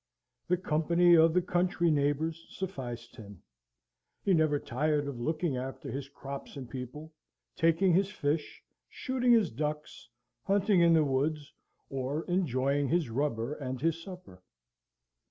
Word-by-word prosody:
The 180 Hz, -, +2 dB
company 170 Hz, +1 st, +3 dB
of 165 Hz, 0 st, +5 dB
the 180 Hz, -, +3 dB
country 175 Hz, -1 st, +1 dB
neighbours 155 Hz, +3 st, 0 dB
sufficed 120 Hz, -11 st, -6 dB
him; 100 Hz, -5 st, -12 dB, 0.8 s
he 195 Hz, -, +3 dB
never 155 Hz, -3 st, +3 dB
tired 145 Hz, +3 st, -1 dB
of 135 Hz, -4 st, -5 dB
looking 155 Hz, +1 st, -1 dB
after 130 Hz, +1 st, -6 dB
his 140 Hz, 0 st, -5 dB
crops 140 Hz, 0 st, -8 dB
and 130 Hz, -3 st, -7 dB
people, 135 Hz, +6 st, -8 dB, 0.4 s
taking 165 Hz, +2 st, +3 dB
his 195 Hz, +3 st, +3 dB
fish, 150 Hz, -5 st, -3 dB, 0.3 s
shooting 255 Hz, -2 st, 0 dB
his 220 Hz, -8 st, +4 dB
ducks, 150 Hz, -2 st, -5 dB, 0.3 s
hunting 200 Hz, -, +2 dB
in 170 Hz, -1 st, +6 dB
his 160 Hz, -, +4 dB
woods, 145 Hz, +2 st, -1 dB, 0.4 s
or 135 Hz, +4 st, -2 dB
enjoying 140 Hz, -6 st, 0 dB
his 165 Hz, -2 st, +1 dB
rubber 125 Hz, -1 st, -1 dB
and 130 Hz, -3 st, -5 dB
his 165 Hz, +3 st, 0 dB
supper. 180 Hz, -, -11 dB
150 Hz, 135 wpm, -30 LUFS, 135-175 Hz, 0.8 s, in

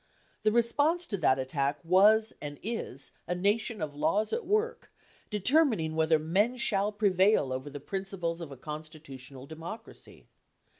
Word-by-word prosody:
The 215 Hz, -, +3 dB
response 290 Hz, +10 st, +2 dB
to 200 Hz, -, -3 dB
that 135 Hz, -6 st, +3 dB
attack 140 Hz, +2 st, -1 dB
was 210 Hz, +6 st, +5 dB
and 145 Hz, -1 st, -6 dB
is 210 Hz, -, -4 dB, 0.2 s
a 180 Hz, -, -1 dB
Nation 205 Hz, +1 st, 0 dB
of 150 Hz, -2 st, -4 dB
laws 165 Hz, +9 st, 0 dB
at 470 Hz, -, -2 dB
work, 430 Hz, +4 st, 0 dB, 0.4 s
determining 215 Hz, -, +2 dB
whether 160 Hz, 0 st, +3 dB
men 195 Hz, +11 st, +1 dB
shall 205 Hz, -3 st, +1 dB
prevail 195 Hz, -8 st, +3 dB
over 130 Hz, +3 st, -5 dB
the 145 Hz, 0 st, -7 dB
principles 180 Hz, 0 st, -4 dB
of 160 Hz, -4 st, -7 dB
a 135 Hz, -, -9 dB
con 150 Hz, +4 st, -6 dB
stitutional 140 Hz, -4 st, -11 dB
democracy. 165 Hz, +9 st, -10 dB
180 Hz, 150 wpm, -29 LUFS, 150-220 Hz, 0.4 s, was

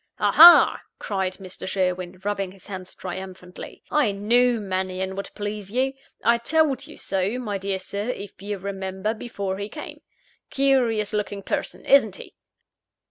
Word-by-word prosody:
"Aha!" 340 Hz, +2 st, +8 dB, 0.2 s
cried 190 Hz, -2 st, -2 dB
Mr. 185 Hz, -1 st, -9 dB
Sherwin, 185 Hz, -1 st, -2 dB
rubbing 195 Hz, -2 st, -2 dB
his 195 Hz, -, -18 dB
hands 185 Hz, -2 st, -8 dB
triumphantly 185 Hz, 0 st, -8 dB
"I 290 Hz, -8 st, +3 dB
knew 235 Hz, +4 st, +2 dB
Mannion 190 Hz, -1 st, -3 dB
would 200 Hz, -, -5 dB
please 205 Hz, -1 st, -5 dB
you. 260 Hz, +3 st, 0 dB, 0.3 s
I 235 Hz, 0 st, +4 dB
told 300 Hz, +1 st, +1 dB
you -, -, -12 dB
so, 195 Hz, +4 st, -1 dB
my 210 Hz, -6 st, -3 dB
dear 195 Hz, 0 st, -2 dB
Sir, 200 Hz, +4 st, -5 dB
if 200 Hz, -6 st, -6 dB
you 205 Hz, 0 st, -4 dB
remember, 190 Hz, +2 st, -3 dB
before 200 Hz, -4 st, -5 dB
he 200 Hz, +1 st, -4 dB
came. -, -, -9 dB, 0.5 s
Curious 245 Hz, -6 st, +2 dB
looking 205 Hz, -1 st, -3 dB
person -, -, -3 dB
isn't 220 Hz, -8 st, +5 dB
he?" -, -, -12 dB
200 Hz, 145 wpm, -24 LUFS, 190-230 Hz, 0.5 s, Aha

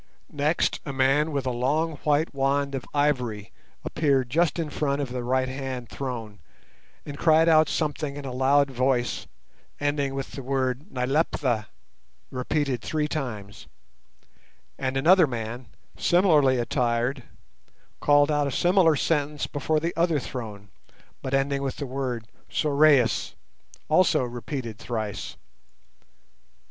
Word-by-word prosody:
Next 150 Hz, +3 st, +1 dB
a 140 Hz, -, -5 dB
man 135 Hz, +3 st, +2 dB
with 140 Hz, -3 st, -2 dB
a 130 Hz, -, 0 dB
long 145 Hz, +6 st, 0 dB
white 150 Hz, +2 st, +1 dB
wand 140 Hz, +1 st, 0 dB
of 135 Hz, -2 st, -4 dB
ivory 125 Hz, -8 st, 0 dB, 0.3 s
appeared 135 Hz, -5 st, +1 dB
just 170 Hz, +3 st, +2 dB
in 160 Hz, -3 st, -3 dB
front 145 Hz, -1 st, -1 dB
of 140 Hz, -4 st, -3 dB
the 125 Hz, -1 st, -3 dB
right 130 Hz, +1 st, +1 dB
hand 130 Hz, -2 st, -5 dB
throne, 115 Hz, -6 st, -6 dB, 0.7 s
and 145 Hz, -1 st, -7 dB
cried 160 Hz, 0 st, +5 dB
out 155 Hz, -2 st, +5 dB
something 150 Hz, -2 st, -2 dB
in 145 Hz, -, -7 dB
a 130 Hz, -, -4 dB
loud 135 Hz, +2 st, +3 dB
voice, 125 Hz, -1 st, 0 dB, 0.5 s
ending 145 Hz, -1 st, -1 dB
with 135 Hz, -1 st, -4 dB
the 135 Hz, -, -7 dB
word 130 Hz, -, -2 dB
Nyleptha, 125 Hz, -4 st, 0 dB, 0.6 s
repeated 130 Hz, -1 st, -1 dB
three 150 Hz, +7 st, -1 dB
times; 110 Hz, -10 st, -5 dB, 1.1 s
and 130 Hz, 0 st, -1 dB
another 170 Hz, +4 st, +5 dB
man, 120 Hz, 0 st, -5 dB, 0.3 s
similarly 155 Hz, -8 st, +4 dB
attired, 120 Hz, +1 st, 0 dB, 0.8 s
called 145 Hz, 0 st, +4 dB
out 145 Hz, -1 st, +1 dB
a -, -, -2 dB
similar 175 Hz, 0 st, +4 dB
sentence 150 Hz, -1 st, 0 dB
before 155 Hz, +2 st, -1 dB
the 165 Hz, +2 st, -3 dB
other 165 Hz, -2 st, +2 dB
throne, 110 Hz, -7 st, -6 dB, 0.5 s
but 135 Hz, +1 st, -1 dB
ending 140 Hz, 0 st, 0 dB
with 135 Hz, -1 st, -2 dB
the 145 Hz, -, -4 dB
word 125 Hz, -3 st, -3 dB, 0.2 s
Sorais, 145 Hz, -4 st, +3 dB, 0.5 s
also 155 Hz, -4 st, +3 dB
repeated 120 Hz, -2 st, -5 dB
thrice. 110 Hz, -4 st, -4 dB
135 Hz, 130 wpm, -25 LUFS, 125-150 Hz, 1.1 s, cried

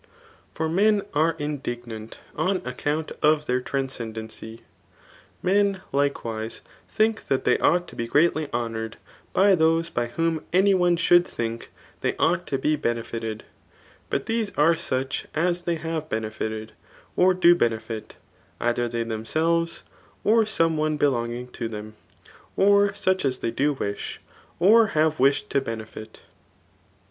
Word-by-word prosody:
lOS -, -, -30 dB, 0.5 s
For 160 Hz, -, -1 dB
mep 200 Hz, +5 st, +3 dB
s^ 160 Hz, +2 st, +2 dB
m<!^giiant 120 Hz, -7 st, -5 dB, 0.2 s
on 190 Hz, +1 st, +1 dB
account 145 Hz, +5 st, -2 dB
of 150 Hz, 0 st, +3 dB
their 125 Hz, -1 st, 0 dB
traiiscem 130 Hz, -4 st, -3 dB
denqr* 110 Hz, +1 st, -8 dB, 0.8 s
Meiif 200 Hz, +1 st, +2 dB
likewise^ 115 Hz, -6 st, -1 dB, 0.3 s
think 220 Hz, 0 st, +1 dB
that 135 Hz, -, 0 dB
they -, -, +3 dB
ought 175 Hz, 0 st, +2 dB
to -, -, -12 dB
be 115 Hz, -, -3 dB
^eatly 155 Hz, +2 st, +2 dB
lionoured 115 Hz, -2 st, -3 dB, 0.4 s
by 195 Hz, +1 st, +5 dB
those 165 Hz, 0 st, +2 dB
by 120 Hz, 0 st, -1 dB
whom 165 Hz, +5 st, -1 dB
any 195 Hz, +3 st, +4 dB
one 175 Hz, -2 st, +3 dB
should 175 Hz, +1 st, +5 dB
thii^k 115 Hz, -5 st, -4 dB, 0.3 s
they -, -, 0 dB
oiight 175 Hz, +2 st, +1 dB
to 135 Hz, -, 0 dB
be 150 Hz, +3 st, +1 dB
benefited; 115 Hz, -3 st, -3 dB, 0.7 s
but -, -, -1 dB
these 225 Hz, -1 st, -1 dB
are 160 Hz, +3 st, +5 dB
such 130 Hz, -3 st, -3 dB
as 175 Hz, +2 st, +1 dB
they 170 Hz, -1 st, -1 dB
l^a^ve 160 Hz, -1 st, -4 dB
J^enefited» 110 Hz, 0 st, -3 dB, 0.5 s
or 185 Hz, 0 st, +4 dB
do 175 Hz, -1 st, +6 dB
benefit^ 115 Hz, -5 st, -2 dB, 0.5 s
either 120 Hz, 0 st, 0 dB
they 115 Hz, 0 st, -2 dB
themselves^ 160 Hz, +10 st, -1 dB, 0.4 s
or 225 Hz, +1 st, +4 dB
soiiie 165 Hz, -6 st, +1 dB
one 155 Hz, 0 st, 0 dB
belonging 125 Hz, -3 st, 0 dB
to 120 Hz, -1 st, -4 dB
them, 110 Hz, -1 st, -7 dB, 0.6 s
or 200 Hz, +1 st, +4 dB
such 185 Hz, -1 st, +1 dB
as 130 Hz, -2 st, +1 dB
they 115 Hz, -, -2 dB
do 145 Hz, +5 st, +1 dB
wish^ 100 Hz, -5 st, -4 dB, 0.4 s
or 220 Hz, +4 st, +6 dB
h%ve 155 Hz, -5 st, +1 dB
wished 135 Hz, -5 st, +2 dB
to 140 Hz, -, +2 dB
benefit. 110 Hz, -2 st, -7 dB
150 Hz, 145 wpm, -25 LUFS, 115-175 Hz, 0.8 s, do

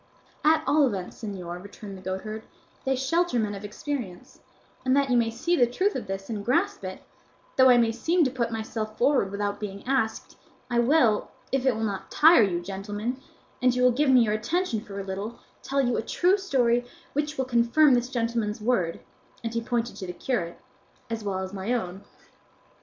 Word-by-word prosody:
"At 315 Hz, +1 st, +4 dB
all 295 Hz, -2 st, +4 dB
events, 195 Hz, -6 st, -5 dB
señor," 180 Hz, -4 st, -5 dB
returned 200 Hz, 0 st, -9 dB
the 190 Hz, -, -11 dB
goatherd, 190 Hz, +4 st, -4 dB, 0.4 s
"they 265 Hz, 0 st, +2 dB
shelter 305 Hz, +4 st, +1 dB
men 215 Hz, -3 st, 0 dB
of 200 Hz, 0 st, -7 dB
experience; 210 Hz, -3 st, -6 dB, 0.4 s
and 260 Hz, 0 st, +3 dB
that 275 Hz, -2 st, +2 dB
you -, -, +4 dB
may 230 Hz, -1 st, +3 dB
see 245 Hz, +10 st, 0 dB
the 245 Hz, -7 st, +4 dB
truth 375 Hz, -, 0 dB
of 240 Hz, -5 st, -4 dB
this 195 Hz, 0 st, -5 dB
and 215 Hz, -3 st, -4 dB
grasp 360 Hz, -, +1 dB
it, -, -, -6 dB, 0.5 s
though 260 Hz, 0 st, +7 dB
I 245 Hz, -, +7 dB
may 230 Hz, -1 st, +3 dB
seem 335 Hz, +9 st, +2 dB
to 260 Hz, -, +1 dB
put 240 Hz, -3 st, -1 dB
myself 220 Hz, -1 st, -4 dB
forward 260 Hz, -6 st, +3 dB
without 200 Hz, 0 st, -2 dB
being 200 Hz, -2 st, -6 dB
asked, 255 Hz, -4 st, -1 dB, 0.3 s
I 240 Hz, -, +2 dB
will, 240 Hz, -4 st, +3 dB, 0.2 s
if 270 Hz, 0 st, +1 dB
it 255 Hz, -, +3 dB
will 220 Hz, -, -3 dB
not 200 Hz, -3 st, -3 dB
tire 320 Hz, -2 st, +7 dB
you, 180 Hz, -5 st, +1 dB
gentlemen, 205 Hz, +7 st, -4 dB, 0.4 s
and 250 Hz, 0 st, +3 dB
you 250 Hz, -, +1 dB
will 250 Hz, -, +6 dB
give 280 Hz, +4 st, +2 dB
me 255 Hz, -2 st, +7 dB
your 215 Hz, -2 st, +2 dB
attention 230 Hz, -, -1 dB
for 200 Hz, -3 st, -8 dB
a -, -, -3 dB
little, 200 Hz, +5 st, -5 dB, 0.2 s
tell 275 Hz, +1 st, 0 dB
you 245 Hz, -2 st, +1 dB
a -, -, +1 dB
true 355 Hz, -, +2 dB
story 245 Hz, -11 st, +2 dB, 0.3 s
which 295 Hz, +1 st, -1 dB
will 265 Hz, -, 0 dB
confirm 255 Hz, +4 st, +4 dB
this 245 Hz, 0 st, +1 dB
gentleman's 230 Hz, -3 st, -1 dB
word 210 Hz, -7 st, 0 dB, 0.4 s
(and 230 Hz, 0 st, -3 dB
he 230 Hz, -, -1 dB
pointed 240 Hz, 0 st, -2 dB
to 190 Hz, -, -6 dB
the 180 Hz, -, -5 dB
curate) 180 Hz, -5 st, -3 dB, 0.5 s
as 225 Hz, -1 st, -3 dB
well 200 Hz, -2 st, -2 dB
as 190 Hz, +1 st, -7 dB
my 200 Hz, +4 st, -2 dB
own." 190 Hz, -5 st, -3 dB
235 Hz, 200 wpm, -26 LUFS, 205-265 Hz, 0.5 s, though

